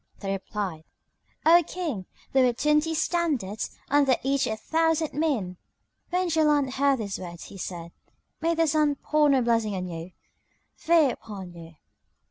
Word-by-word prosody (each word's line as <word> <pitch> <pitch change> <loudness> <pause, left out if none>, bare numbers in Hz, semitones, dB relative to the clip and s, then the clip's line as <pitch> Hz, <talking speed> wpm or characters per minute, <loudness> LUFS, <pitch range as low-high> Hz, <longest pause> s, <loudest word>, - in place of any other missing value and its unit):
They 195 -2 -3
replied, 195 -4 -4 0.6
"O 340 +2 +7
King, 300 - -4 0.3
there 265 -1 +5
were 250 -1 +3
twenty 300 +5 +1
standards, 305 - -1
under 280 -2 +4
each 275 +1 +1
a 220 - -2
thousand 320 +3 0
men." 260 - -1 0.5
When 360 +1 0
Jaland 300 -4 +2
heard 275 0 +2
these 205 -4 -4
words 170 -2 -8
he 195 - -11
said, 170 -2 -6 0.5
"May 335 +1 +1
the 330 0 +3
sun 300 -1 +2
pour 300 +1 +2
no 265 -3 +3
blessing 225 -3 +1
on 185 -1 -3
you! 170 0 -7 0.6
Fie 320 -5 +3
upon 195 -6 -9
you! 165 -1 -12
270 Hz, 150 wpm, -26 LUFS, 195-310 Hz, 0.6 s, O